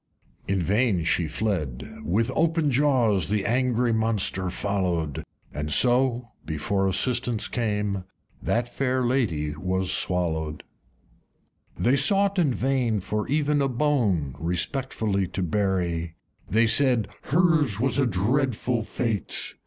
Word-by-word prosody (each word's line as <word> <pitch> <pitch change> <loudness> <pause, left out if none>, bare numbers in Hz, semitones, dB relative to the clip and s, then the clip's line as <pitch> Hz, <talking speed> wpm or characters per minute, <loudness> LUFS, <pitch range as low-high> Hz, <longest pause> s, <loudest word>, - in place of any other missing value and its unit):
In 95 -2 0
vain 100 -1 +1
she 85 0 +1
fled: 80 - -3
with 110 +6 0
open 165 -2 +1
jaws 125 - +2
The 105 -1 -1
angry 125 0 +1
monster 110 -4 0
followed, 90 -6 -2 0.3
And 75 +1 -4
so 125 0 +2
(before 95 +6 -1
assistance 120 +3 +1
came) 105 -5 -2 0.4
That 120 +1 0
Lady 125 - 0
Fair 75 - -9
was 95 +1 -1
swollowed. 80 -5 -1 1.1
V. - - -4
They - - +4
sought 195 +7 +3
in 155 -6 +3
vain 125 -4 0
for 105 +3 -3
even 150 0 +1
a 135 - +1
bone 115 - 0
Respectfully 100 - -1
to 95 - -3
bury; 85 -3 -1 0.3
They 115 +2 +3
said, 125 -2 +3 0.2
"Hers 155 - +2
was 130 +1 +1
a 135 - +3
dreadful 120 +3 0
fate!" 110 -1 -3
110 Hz, 120 wpm, -25 LUFS, 90-130 Hz, 1.1 s, They